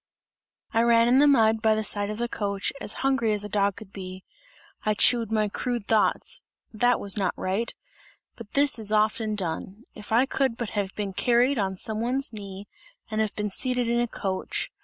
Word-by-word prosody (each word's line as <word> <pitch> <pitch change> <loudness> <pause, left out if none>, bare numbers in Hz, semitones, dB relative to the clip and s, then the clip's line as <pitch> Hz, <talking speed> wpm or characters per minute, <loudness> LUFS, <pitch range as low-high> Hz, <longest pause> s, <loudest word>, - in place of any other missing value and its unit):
I 225 - +3
ran 235 0 +4
in 250 +2 +5
the 290 - +6
mud, 225 -5 +4
by 220 -1 +3
the 215 - -1
side 205 0 -1
of 215 - -4
the 240 +1 -1
coach, 200 -3 -2
as - - -2
hungry 235 -5 +2
as 210 0 -1
a - - -6
dog 200 -1 +1
could 210 -3 -12
be; 185 -1 -8 0.6
I 215 0 +1
chewed 230 0 +4
my 215 -1 +2
crude 240 +1 -3
thoughts, 220 -2 +1 0.3
that 245 +3 +2
was 200 +1 -2
not 190 -3 0
right 200 +5 -1 0.6
but 225 -3 -12
this 280 -4 +3
is 215 -1 -1
often 215 0 +1
done! 190 +3 -4
If 210 0 -10
I 235 +4 +4
could 265 -3 0
but 235 -3 -4
have 200 -3 -3
been 200 -2 -3
carried 245 +5 +2
on 190 -2 -1
some 215 +3 0
one's 255 +2 +1
knee 200 -1 -8 0.4
and 215 0 0
have 215 -2 -2
been 210 -1 -2
seated 250 +3 0
in 235 0 +1
a 240 - +1
coach! 190 -4 -3
215 Hz, 200 wpm, -26 LUFS, 205-235 Hz, 0.6 s, the